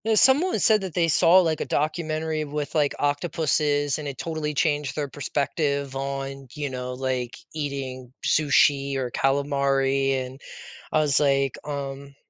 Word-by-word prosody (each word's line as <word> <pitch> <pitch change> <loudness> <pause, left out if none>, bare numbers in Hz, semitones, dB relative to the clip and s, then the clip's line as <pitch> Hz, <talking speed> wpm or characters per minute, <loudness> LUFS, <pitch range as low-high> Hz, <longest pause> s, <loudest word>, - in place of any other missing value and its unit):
No, 220 0 +2
someone 280 +11 +4
said 215 -3 +4
that 190 -4 -6
they 170 -2 +3
saw, 165 +3 +5
like, 160 -3 0
a - - -1
documentary 155 0 -1
with, 150 -1 -4
like, 150 -3 +1
octopuses, 145 -1 0
and 150 - -5
it 135 -2 -6
totally 155 0 -3
changed 145 -1 0
their 150 -2 -2
perspective 140 0 -2
on, 135 0 -4
you 145 -2 -3
know, 125 0 -4
like, 125 -2 -3 0.2
eating 135 -4 -5
sushi 140 -2 +3
or 130 -2 -2
calamari. 135 0 +1
And 130 +2 -11 0.5
I 155 - +3
was, 145 -3 +2
like, 140 -2 +2
um, 140 -1 -6
145 Hz, 150 wpm, -25 LUFS, 135-155 Hz, 0.5 s, saw